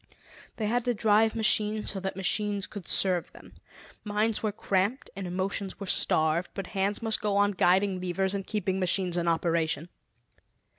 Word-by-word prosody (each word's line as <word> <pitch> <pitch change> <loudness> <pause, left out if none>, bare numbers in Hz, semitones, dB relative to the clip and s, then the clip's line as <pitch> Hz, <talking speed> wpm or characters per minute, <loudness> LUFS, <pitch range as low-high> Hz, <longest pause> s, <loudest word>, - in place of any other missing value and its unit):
They 220 - -3
had 240 +3 0
to 245 -1 +1
drive 215 +1 +3
machines 215 -1 +2
so 195 - -5
that 190 0 -4
machines 200 +1 0
could 200 -5 -9
serve 185 -3 +2
them. - - -15 0.5
Minds 210 +1 0
were 215 - 0
cramped 200 +5 -1
and 195 -1 -5
emotions 190 +2 -3
were 200 - -5
starved, 160 -1 +2
but 195 - -4
hands 200 +3 -2
must 220 -1 0
go 205 -1 0
on 205 0 +3
guiding 185 0 +2
levers 190 +2 -1
and 195 -1 -4
keeping 190 -3 -1
machines 185 -1 0
in 170 -1 0
operation. 165 -1 0
195 Hz, 165 wpm, -28 LUFS, 185-210 Hz, 0.5 s, drive